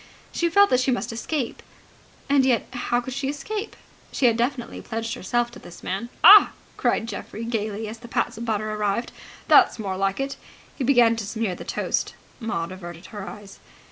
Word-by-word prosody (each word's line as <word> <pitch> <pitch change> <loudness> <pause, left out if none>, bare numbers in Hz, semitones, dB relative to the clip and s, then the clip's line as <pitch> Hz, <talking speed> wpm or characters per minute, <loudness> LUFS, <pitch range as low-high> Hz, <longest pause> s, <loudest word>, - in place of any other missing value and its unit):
She 340 - 0
felt 400 +4 +5
that 255 - +4
she 255 - +1
must 245 -2 -1
escape. 245 +2 -3 0.7
And 280 -1 +4
yet 255 -3 +2
how 245 -1 0
could 260 +1 -6
she 275 +1 -2
escape? 415 +10 -5 0.4
She 265 - 0
had 235 -2 +5
definitely 240 +1 -2
pledged 225 0 -4
herself 240 +5 -1
to - - -11
this 175 - -13
man. 200 +6 -3
("Ah!" 410 0 +10 0.2
cried 225 - 0
Geoffrey 220 +1 -6
gaily, 220 -2 -3
as 220 +1 -8
the 235 - -11
pats 235 +1 -1
of 230 - -6
butter 215 -1 -1
arrived. 210 +2 -1 0.4
"That's - - +6
more 195 -4 -3
like 195 +2 0
it!" 275 0 -3 0.4
He 275 - -3
began 240 -3 +5
to 225 - -3
smear 220 -3 -2
the - - -9
toast. - - -2 0.2
Maud 185 -7 -3
averted 175 -1 -9
her 205 -2 -6
eyes.) 205 -2 -12
230 Hz, 190 wpm, -24 LUFS, 210-260 Hz, 0.7 s, Ah